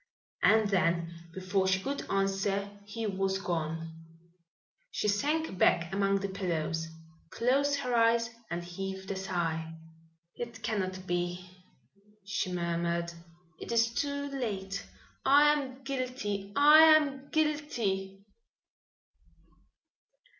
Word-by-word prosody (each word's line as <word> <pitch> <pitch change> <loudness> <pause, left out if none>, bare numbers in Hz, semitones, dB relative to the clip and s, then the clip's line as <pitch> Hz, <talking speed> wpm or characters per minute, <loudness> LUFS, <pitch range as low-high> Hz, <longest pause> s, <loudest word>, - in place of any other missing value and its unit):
And 220 -1 +5
then 170 -3 +1 0.2
before 190 +2 0
she 185 0 +3
could 280 +8 -4
answer 195 +1 0
he 225 +2 -5
was 195 -1 0
gone. 165 -3 -3 1.0
She - - -2
sank 285 - 0
back 170 +1 +3
among 195 0 +1
the 200 - -1
pillows, 165 -4 -2 0.4
closed 275 +7 +2
her 250 -2 -2
eyes 230 0 +4 0.2
and 170 +1 -3
heaved 190 +2 -6
a - - -2
sigh. 165 -4 -2 0.6
"It 235 -2 -7
cannot 185 -3 -2
be!" 175 0 -2 0.8
she 195 -2 -2
murmured. 170 -1 -1 0.5
"It - - -7
is 230 0 +2
too 285 +1 -2
late! 195 -7 -3 0.4
I 290 +2 +6
am 270 -2 -4
guilty! 250 -7 -3
I 295 +2 +8 0.2
am 280 -2 -3
guilty!" 225 -11 -1
195 Hz, 110 wpm, -30 LUFS, 180-245 Hz, 1.0 s, I